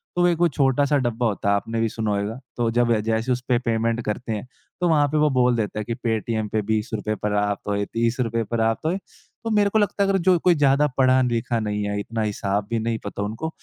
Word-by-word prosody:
तो 175 Hz, 0 st, +3 dB
एक 170 Hz, -2 st, +2 dB
वो 175 Hz, -, +5 dB
छोटा-सा 140 Hz, 0 st, +2 dB
डब्बा 120 Hz, 0 st, -1 dB
होता 100 Hz, -1 st, -1 dB
है 100 Hz, -, +4 dB
आपने 115 Hz, +3 st, -2 dB
भी 115 Hz, -, +1 dB
सुना 110 Hz, -1 st, -2 dB
होयगा। 105 Hz, +4 st, -2 dB, 0.2 s
तो 120 Hz, -1 st, +1 dB
जब 120 Hz, 0 st, +2 dB
जैसे 115 Hz, +3 st, -1 dB
उसपे 125 Hz, 0 st, +1 dB
पेमेंट 115 Hz, -1 st, 0 dB
करते 115 Hz, +2 st, -3 dB
हैं 105 Hz, +3 st, -5 dB, 0.3 s
तो 175 Hz, -, +3 dB
वहाँ 150 Hz, -3 st, +4 dB
पे 150 Hz, +2 st, -1 dB
वो 150 Hz, 0 st, +4 dB
बोल 125 Hz, -1 st, +4 dB
देता 110 Hz, -1 st, -2 dB
है 105 Hz, -, -4 dB
कि 115 Hz, -, -2 dB
"पेटीएम 110 Hz, -2 st, -2 dB
पे 110 Hz, -, 0 dB
20 110 Hz, +2 st, -1 dB
रुपए 110 Hz, 0 st, -2 dB
प्राप्त 105 Hz, -1 st, -1 dB
होए। 100 Hz, 0 st, 0 dB
30 115 Hz, +3 st, 0 dB
रुपए 115 Hz, -2 st, 0 dB
प्राप्त 115 Hz, +4 st, 0 dB
होए।" 175 Hz, +4 st, +1 dB, 0.5 s
तो 225 Hz, -, -2 dB
मेरे 205 Hz, -1 st, +3 dB
को 220 Hz, +2 st, +2 dB
लगता 200 Hz, 0 st, +1 dB
है 195 Hz, -, +1 dB
अगर 195 Hz, -, +3 dB
जो 180 Hz, -2 st, +6 dB
कोई 175 Hz, 0 st, +4 dB
ज़्यादा 145 Hz, 0 st, +3 dB
पढ़ा-लिखा 125 Hz, -3 st, +2 dB
नहीं 105 Hz, -1 st, -2 dB
है 100 Hz, 0 st, -2 dB
इतना 115 Hz, +2 st, -4 dB
हिसाब 100 Hz, -1 st, -1 dB
भी 115 Hz, -1 st, 0 dB
नहीं 115 Hz, 0 st, -2 dB
पता 100 Hz, 0 st, -4 dB
उनको। 110 Hz, +10 st, -4 dB
115 Hz, 240 wpm, -23 LUFS, 110-135 Hz, 0.5 s, जो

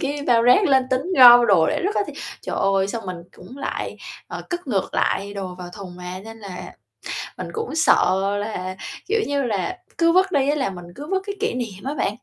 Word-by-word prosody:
cái 285 Hz, +1 st, -2 dB
bao 230 Hz, -2 st, +4 dB
rác 250 Hz, -, +6 dB
lên 265 Hz, -4 st, +4 dB
tính 260 Hz, +1 st, +1 dB, 0.2 s
gom 240 Hz, -1 st, +10 dB
đồ 180 Hz, -6 st, +5 dB
để -, -, 0 dB
rứt 405 Hz, +3 st, 0 dB
á -, -, +2 dB
thì, -, -, -7 dB, 0.3 s
trời -, -, -4 dB
ơi, 195 Hz, 0 st, +2 dB
xong 225 Hz, -2 st, -5 dB
mình 180 Hz, -1 st, -4 dB, 0.2 s
cũng 250 Hz, +10 st, -12 dB
lại, -, -, -4 dB, 0.3 s
ờ, -, -, -6 dB
cất 350 Hz, -3 st, -4 dB
ngược 200 Hz, -7 st, -1 dB
lại 200 Hz, +1 st, 0 dB
đồ 185 Hz, -2 st, -5 dB
vào 180 Hz, -1 st, -7 dB
thùng 185 Hz, -3 st, -9 dB
mà, 180 Hz, +1 st, -7 dB
nên 225 Hz, 0 st, -10 dB
là 195 Hz, -4 st, -8 dB, 0.8 s
mình -, -, -5 dB
cũng 450 Hz, -7 st, -4 dB
sợ 190 Hz, -, +4 dB, 0.2 s
là, 185 Hz, -3 st, -4 dB, 0.3 s
kiểu 440 Hz, +2 st, +2 dB
như 285 Hz, -1 st, 0 dB
là, 230 Hz, -, -2 dB, 0.2 s
c -, -, -37 dB
cứ 335 Hz, 0 st, +4 dB
vứt 375 Hz, +1 st, +3 dB
đi 275 Hz, -1 st, +2 dB
á 295 Hz, -, +2 dB
là 265 Hz, -8 st, 0 dB
mình 175 Hz, -2 st, -9 dB
cứ 290 Hz, -, -7 dB
vứt 380 Hz, 0 st, 0 dB
cái 400 Hz, -, -4 dB
kỷ 440 Hz, -, 0 dB
niệm 225 Hz, -5 st, -5 dB
á 280 Hz, +2 st, -2 dB
bạn. -, -, 0 dB
240 Hz, 235 wpm, -22 LUFS, 190-290 Hz, 0.8 s, gom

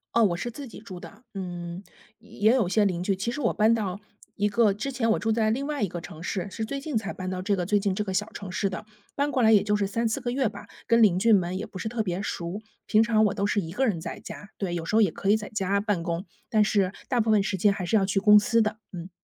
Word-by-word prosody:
哦， 230 Hz, -, +5 dB
我 175 Hz, -4 st, +2 dB
是 240 Hz, -, -3 dB
自 275 Hz, +4 st, -8 dB
己 230 Hz, -, -11 dB
住 200 Hz, -4 st, -9 dB
的， 205 Hz, +6 st, -12 dB
嗯， 175 Hz, -1 st, -6 dB, 0.4 s
也 220 Hz, 0 st, +1 dB
有 225 Hz, -9 st, +1 dB
些 210 Hz, +2 st, +3 dB
邻 180 Hz, -3 st, -1 dB
居， 195 Hz, -1 st, 0 dB
其 230 Hz, +5 st, -2 dB
实 295 Hz, -, -4 dB
我 235 Hz, -, +1 dB
搬 220 Hz, +2 st, +4 dB
到 200 Hz, -4 st, -2 dB, 0.4 s
一 205 Hz, -, +1 dB
个 210 Hz, 0 st, +3 dB
之 215 Hz, +7 st, -4 dB
前 235 Hz, -4 st, 0 dB
我 -, -, +2 dB
住 225 Hz, -, -2 dB
在 220 Hz, -1 st, +2 dB
另 275 Hz, +5 st, -2 dB
外 295 Hz, -7 st, -2 dB
一 195 Hz, -, 0 dB
个 175 Hz, -, -5 dB
城 165 Hz, -1 st, -10 dB
市， 185 Hz, +1 st, -3 dB
是 220 Hz, -, -5 dB
最 275 Hz, +6 st, -3 dB
近 290 Hz, -2 st, -5 dB
才 210 Hz, -1 st, -3 dB
搬 185 Hz, -1 st, -5 dB
到 185 Hz, 0 st, -3 dB
这 200 Hz, +1 st, 0 dB
个 180 Hz, -, -1 dB
最 205 Hz, +1 st, +2 dB
近 195 Hz, -2 st, 0 dB
这 200 Hz, -, -2 dB
个 190 Hz, -, -3 dB
小 210 Hz, +4 st, -1 dB
城 200 Hz, -3 st, -8 dB
市 195 Hz, +2 st, -1 dB
的， 190 Hz, -, -6 dB, 0.3 s
搬 285 Hz, +1 st, 0 dB
过 255 Hz, -4 st, +1 dB
来 220 Hz, -, +6 dB
也 210 Hz, -3 st, +6 dB
就 210 Hz, 0 st, +1 dB
是 205 Hz, -1 st, +1 dB
3-4 230 Hz, +5 st, -1 dB
个 240 Hz, -1 st, -2 dB
月 265 Hz, -1 st, +1 dB
吧， -, -, -8 dB, 0.2 s
跟 230 Hz, -1 st, +5 dB
邻 185 Hz, -4 st, +4 dB
居 225 Hz, +2 st, +4 dB
们 185 Hz, -1 st, +2 dB
也 210 Hz, -, -4 dB
不 210 Hz, -3 st, -10 dB
是 220 Hz, +3 st, -3 dB
特 235 Hz, -1 st, -2 dB
别 185 Hz, -2 st, -2 dB
熟， 180 Hz, +2 st, -4 dB, 0.2 s
平 215 Hz, 0 st, +4 dB
常 220 Hz, -1 st, +3 dB
我 205 Hz, -, +1 dB
都 200 Hz, -1 st, -1 dB
是 205 Hz, 0 st, +1 dB
一 165 Hz, -3 st, -5 dB
个 265 Hz, +7 st, +1 dB
人 200 Hz, -9 st, 0 dB
在 165 Hz, 0 st, -7 dB
家， 205 Hz, -, -10 dB
对， 190 Hz, -4 st, -3 dB
有 170 Hz, -1 st, -3 dB
时 210 Hz, -, -1 dB
候 225 Hz, -, +6 dB
也 195 Hz, -7 st, +3 dB
可 195 Hz, -, -3 dB
以 210 Hz, -, +6 dB
在 210 Hz, -2 st, -4 dB
家 200 Hz, -1 st, 0 dB
办 205 Hz, -5 st, -1 dB
公， 170 Hz, +3 st, -3 dB, 0.2 s
但 215 Hz, -1 st, +4 dB
是 200 Hz, -2 st, +1 dB, 0.2 s
大 250 Hz, -, +1 dB
部 225 Hz, -1 st, +1 dB
分 210 Hz, -2 st, +4 dB
时 195 Hz, 0 st, -2 dB
间 200 Hz, +2 st, +3 dB
还 190 Hz, -2 st, -4 dB
是 220 Hz, +5 st, +2 dB
要 195 Hz, -, +2 dB
去 195 Hz, 0 st, 0 dB
公 210 Hz, 0 st, +8 dB
司 230 Hz, +2 st, +2 dB
的， 215 Hz, 0 st, -1 dB, 0.2 s
嗯。 175 Hz, +1 st, -7 dB
205 Hz, 320 characters per minute, -26 LUFS, 185-225 Hz, 0.4 s, 公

